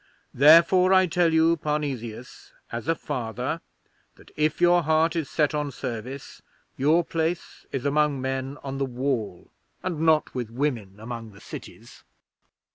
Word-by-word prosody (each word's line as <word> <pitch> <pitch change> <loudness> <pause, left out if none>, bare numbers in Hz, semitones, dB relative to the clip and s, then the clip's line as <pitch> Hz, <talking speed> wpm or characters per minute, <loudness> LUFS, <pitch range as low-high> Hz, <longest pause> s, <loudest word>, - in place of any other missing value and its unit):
Therefore, 170 +6 +6
I 185 0 +6
tell 175 -1 +2
you, 160 +1 +4
Parnesius, 135 -7 -4 0.2
as 115 +3 -5
a 165 - +2
Father, 130 +2 -4 0.5
that - - -19
if 150 0 0
your 175 0 +5
heart 160 +1 +2
is 160 -5 -2
set 150 -1 +1
on 150 -1 -1
service, 130 +1 -7 0.3
your 155 +6 +3
place 165 +1 -3
is 135 -1 -3
among 145 -1 +2
men 130 +1 -3
on 135 0 -5
the 135 - +1
Wall 125 -8 -3 0.3
and 175 -4 -3
not 160 -1 +2
with 125 -4 -4
women 115 -6 -3
among 115 -1 -7
the 100 - -15
cities."' - - -11
145 Hz, 145 wpm, -25 LUFS, 125-160 Hz, 0.5 s, Therefore